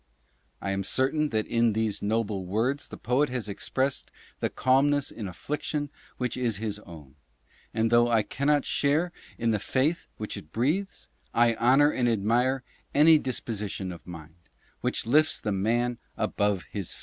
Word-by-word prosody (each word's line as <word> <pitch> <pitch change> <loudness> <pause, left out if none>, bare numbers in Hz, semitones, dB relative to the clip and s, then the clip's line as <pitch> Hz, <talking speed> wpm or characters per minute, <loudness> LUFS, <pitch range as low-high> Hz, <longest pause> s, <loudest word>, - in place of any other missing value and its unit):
I 100 - -1
am 100 0 -1
certain 140 +8 +2
that 110 -3 0
in 115 -1 +2
these 110 -1 -1
noble 105 -2 -1
words 120 +9 0
the - - -9
poet 130 +4 +1
has 125 -4 -2
expressed 130 +6 -1 0.3
the - - 0
calmness 140 +2 +2
in 105 - -6
affliction 145 - -3 0.3
which 125 -1 -2
is 120 -5 -1
his 105 -1 -3
own, 80 -9 -13 0.6
and 115 0 0
though 120 0 +5
I 115 -2 +3
cannot 145 +5 +1
share 155 +5 +1 0.3
in 115 0 +1
the 105 - +1
faith 140 - 0
which 105 - -5
it 75 - -11
breathes, 160 - -1 0.3
I 120 0 +5
honor 135 +6 +4
and 125 -4 +1
admire 120 +5 +1 0.3
any 155 +2 +7
dis 130 -4 -1
position 105 -4 -4
of 85 -1 -11
mind 80 -3 -9 0.5
which - - -1
lifts 155 +7 +3
the 105 - -2
maa 115 +5 +1 0.3
above 105 -3 0
his 100 -5 -2
fate. - - -14
120 Hz, 165 wpm, -27 LUFS, 105-135 Hz, 0.6 s, any